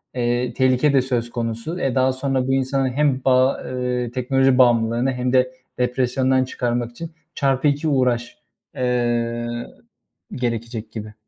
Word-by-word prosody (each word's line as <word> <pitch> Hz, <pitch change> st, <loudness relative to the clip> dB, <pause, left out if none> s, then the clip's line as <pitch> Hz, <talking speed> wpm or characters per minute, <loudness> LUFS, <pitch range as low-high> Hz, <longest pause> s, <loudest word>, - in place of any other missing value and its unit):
eee, 120 Hz, 0 st, 0 dB
tehlike 130 Hz, +2 st, +2 dB
de 135 Hz, -, +5 dB
söz 120 Hz, -2 st, -2 dB
konusu. 115 Hz, +8 st, -4 dB
E, 135 Hz, -6 st, -1 dB
daha 130 Hz, 0 st, +3 dB
sonra 130 Hz, -1 st, -1 dB
bu 135 Hz, -, +1 dB
insanın 135 Hz, 0 st, +1 dB
hem 135 Hz, 0 st, +1 dB
ba 130 Hz, 0 st, +4 dB
ııı, 125 Hz, -1 st, -2 dB
teknoloji 130 Hz, +1 st, +2 dB
bağımlılığını 120 Hz, 0 st, +3 dB
hem 125 Hz, 0 st, -2 dB
de 130 Hz, 0 st, +3 dB, 0.3 s
depresyondan 130 Hz, +1 st, +1 dB
çıkarmak 120 Hz, -2 st, -2 dB
için 165 Hz, +8 st, -8 dB, 0.2 s
çarpı 135 Hz, 0 st, +1 dB
2 145 Hz, +2 st, 0 dB
uğraş, 125 Hz, -4 st, 0 dB, 0.4 s
eee, 120 Hz, -2 st, -1 dB, 0.7 s
gerekecek 115 Hz, -2 st, -3 dB
gibi. 110 Hz, -1 st, -7 dB
125 Hz, 140 wpm, -21 LUFS, 120-130 Hz, 0.7 s, de